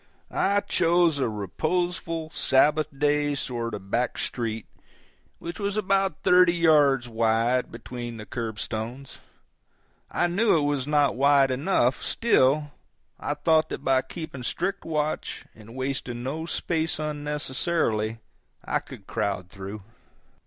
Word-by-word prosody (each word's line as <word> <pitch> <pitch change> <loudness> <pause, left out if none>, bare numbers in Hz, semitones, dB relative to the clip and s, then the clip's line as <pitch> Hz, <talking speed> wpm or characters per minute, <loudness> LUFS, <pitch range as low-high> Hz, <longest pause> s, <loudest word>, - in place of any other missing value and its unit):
I 200 +1 +2
chose 170 -5 +2
a 130 - +1
reposeful 160 - -2
Sabbath 150 +2 +3
day 145 +1 +1
sort 120 -4 -3
of 100 - -8
a - - -17
back 120 +5 -1
street 115 -3 -3 0.7
which 170 -1 -7
was 200 0 -1
about 195 -5 +1
thirty 180 -1 +6
yards 145 -6 +4
wide 115 +2 +1
between 120 0 -7
the 105 - -8
curbstones. 115 +3 -5 0.9
I - - +1
knew 180 +2 +3
it - - +2
was 145 -2 0
not 145 -4 +3
wide 140 0 +4
enough; 130 -2 +1
still, 145 - +2 0.5
I 145 - -2
thought 155 +1 +3
that - - -5
by 130 -2 +3
keeping 140 0 -7
strict 185 +10 -2
watch 155 -1 -2
and 110 +2 -14
wasting 130 -2 -3
no 155 +5 -3
space 160 -1 -1
unnecessarily 145 -6 -1 0.5
I - - +1
could 100 - -12
crowd 95 -4 -2
through. 100 +1 -8
140 Hz, 130 wpm, -26 LUFS, 120-160 Hz, 0.9 s, thirty